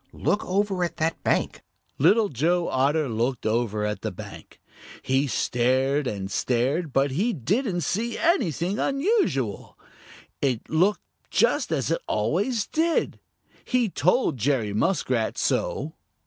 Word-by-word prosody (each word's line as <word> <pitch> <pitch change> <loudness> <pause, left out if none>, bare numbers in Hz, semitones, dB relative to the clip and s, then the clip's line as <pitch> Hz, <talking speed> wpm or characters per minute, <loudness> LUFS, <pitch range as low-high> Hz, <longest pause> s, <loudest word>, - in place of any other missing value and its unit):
Look 205 - 0
over 195 -1 0
at 170 -1 -3
that 160 0 -1
bank." - - 0 0.4
Little 215 -1 +4
Joe 170 +7 +1
Otter 145 +3 +1
looked 120 +2 -2
over 110 -2 0
at 105 -2 -3
the - - -2
bank. - - -11 0.4
He 135 +2 +1
stared 130 +3 +1
and 100 -3 -4
stared, 135 +7 0
but 135 +1 +2
he 205 - 0
didn't 185 - -1
see 220 - -2
anything 205 - +1
unusual. 275 - 0 0.6
It 130 -5 -1
looked 185 +6 +2 0.3
just - - +2
as - - 0
it - - 0
always 235 -6 0
did. 325 +1 0 0.4
He 250 -4 +1
told 180 - +1
Jerry 120 -3 0
Muskrat 120 - 0
so. 150 +4 -1
155 Hz, 130 wpm, -25 LUFS, 125-205 Hz, 0.6 s, Little